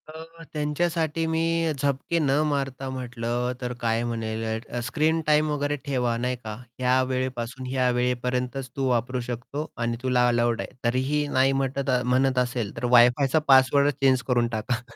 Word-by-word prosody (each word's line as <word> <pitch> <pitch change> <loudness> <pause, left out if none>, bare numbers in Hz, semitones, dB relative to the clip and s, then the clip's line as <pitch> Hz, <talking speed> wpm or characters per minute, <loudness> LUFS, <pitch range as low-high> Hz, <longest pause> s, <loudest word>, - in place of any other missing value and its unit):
तर 165 +1 -11
त्यांच्यासाठी 160 +1 -1
मी 165 0 +1
झपके 140 +4 0
न 145 -4 +1 0.2
मारता 135 -2 -2
म्हटलं 120 -1 -3
तर 125 0 -3
काय 115 0 +1
म्हणेल 115 -1 -3 0.3
अ, 120 - -3
स्क्रीन 160 +5 +1
टाईम 150 0 +3
वगैरे 145 0 -1
ठेवा 125 -4 0
नाही 125 +2 -1
का 110 -1 -5 0.2
ह्या 130 +1 +3
वेळेपासून 130 -1 -3
ह्या 130 -1 +1
वेळेपर्यंतच 125 +1 -1
तू 135 -1 0
वापरू 125 +1 0
शकतो 125 +5 -4
आणि 120 0 -1
तुला 125 -1 +3
अलाऊड 120 -1 +1
आहे. - - -8
तरीही 130 +5 +1
नाही 135 -1 +3
म्हटत 135 +1 -2
अ, 125 -1 +2
म्हणत 130 +1 +2
असेल 125 -4 -2
तर - - -3
वायफायचा 130 +5 +4
पासवर्डच 140 +2 +5
चेंज 130 -2 +4
करून 120 -2 +2
टाका. 115 +2 -2
130 Hz, 160 wpm, -25 LUFS, 125-145 Hz, 0.3 s, पासवर्डच